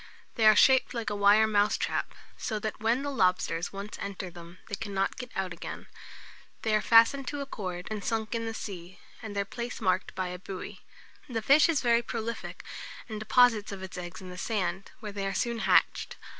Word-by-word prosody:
They 220 Hz, -2 st, +4 dB
are 215 Hz, -, +8 dB
shaped 260 Hz, +2 st, +5 dB
like 230 Hz, -2 st, -2 dB
a -, -, -1 dB
wire 205 Hz, +2 st, +6 dB
mousetrap; 210 Hz, -1 st, +1 dB, 0.2 s
so 220 Hz, -, -3 dB
that 215 Hz, 0 st, -4 dB
when 230 Hz, +5 st, +1 dB
the 285 Hz, -, -2 dB
lobsters 180 Hz, -7 st, +1 dB
once 200 Hz, +2 st, -7 dB
enter 195 Hz, -2 st, -5 dB
them, 170 Hz, +1 st, -12 dB
they -, -, -11 dB
cannot 200 Hz, -2 st, -1 dB
get 250 Hz, -1 st, -6 dB
out 190 Hz, -2 st, -2 dB
again. -, -, -7 dB, 0.8 s
They 220 Hz, -, +1 dB
are 215 Hz, -, +3 dB
fastened 230 Hz, +5 st, +5 dB
to 290 Hz, -1 st, -3 dB
a -, -, -3 dB
cord 185 Hz, -9 st, -5 dB
and 210 Hz, -2 st, -3 dB
sunk 220 Hz, -1 st, -1 dB
in 230 Hz, -1 st, -2 dB
the 225 Hz, -, -3 dB
sea, 185 Hz, -4 st, -7 dB, 0.2 s
and 220 Hz, -3 st, -7 dB
their 200 Hz, 0 st, 0 dB
place 235 Hz, +4 st, -5 dB
marked 185 Hz, -3 st, 0 dB
by 185 Hz, -1 st, -2 dB
a 180 Hz, 0 st, -6 dB
buoy. 185 Hz, 0 st, -7 dB, 0.5 s
The 225 Hz, -3 st, -2 dB
fish 290 Hz, +7 st, +6 dB
is 320 Hz, -4 st, +2 dB
very 235 Hz, -1 st, +4 dB
prolific, 230 Hz, -1 st, -5 dB, 0.4 s
and 215 Hz, -2 st, -5 dB
deposits 220 Hz, -1 st, +4 dB
of 195 Hz, -1 st, -7 dB
its 190 Hz, -, -7 dB
eggs 180 Hz, +1 st, -7 dB
in 185 Hz, -1 st, -9 dB
the 180 Hz, -, -8 dB
sand, 190 Hz, -3 st, -2 dB
where 210 Hz, -2 st, -5 dB
they 200 Hz, -1 st, -3 dB
are 195 Hz, -, -3 dB
soon 235 Hz, +3 st, -1 dB
hatched. -, -, +2 dB
210 Hz, 205 wpm, -29 LUFS, 190-230 Hz, 0.8 s, are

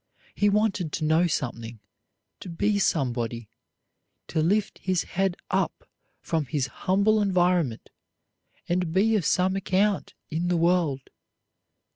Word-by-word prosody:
He 205 Hz, -, +2 dB
wanted 200 Hz, -5 st, 0 dB
to -, -, -2 dB
know 160 Hz, +3 st, +3 dB
something, 115 Hz, -6 st, -4 dB, 0.6 s
to -, -, -9 dB
be 200 Hz, +5 st, 0 dB
somebody, 120 Hz, -, -1 dB, 0.8 s
to 160 Hz, -, 0 dB
lift 205 Hz, +6 st, 0 dB
his 185 Hz, -3 st, 0 dB
head 190 Hz, -1 st, -1 dB
up -, -, -1 dB, 0.3 s
from 160 Hz, -3 st, -1 dB
his 135 Hz, +1 st, -1 dB
humble 200 Hz, +9 st, +1 dB
environment 180 Hz, -, +1 dB, 0.8 s
and 175 Hz, -1 st, 0 dB
be 220 Hz, +4 st, +3 dB
of 195 Hz, -7 st, 0 dB
some 185 Hz, +1 st, +2 dB
account 195 Hz, +1 st, 0 dB, 0.2 s
in 165 Hz, +3 st, -1 dB
the 175 Hz, -1 st, +1 dB
world. 165 Hz, -6 st, +1 dB
175 Hz, 125 wpm, -26 LUFS, 155-195 Hz, 0.8 s, know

